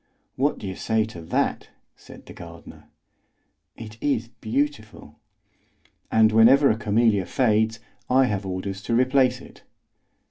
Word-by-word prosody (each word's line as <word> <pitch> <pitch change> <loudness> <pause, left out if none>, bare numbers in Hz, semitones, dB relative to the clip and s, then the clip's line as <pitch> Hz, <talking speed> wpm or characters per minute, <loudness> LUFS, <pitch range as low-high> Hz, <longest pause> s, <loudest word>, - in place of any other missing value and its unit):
"What 140 +3 0
do - - -9
you 95 -1 -5
say 110 -1 0
to 100 -6 -10
that?" 80 - -2 0.3
said - - -15
the - - -12
gardener. 85 -1 -13 0.9
"It 110 -1 -11
is 120 -5 -1
beautiful." 120 -1 -4 0.9
"And 110 0 +4
whenever 125 +6 +5
a - - 0
camellia 105 -2 +1
fades, 110 -2 +1 0.3
I 130 +1 +4
have 105 -4 -2
orders 95 +1 -5
to 115 - 0
replace 130 0 +2
it." - - -16
110 Hz, 135 wpm, -23 LUFS, 105-125 Hz, 0.9 s, whenever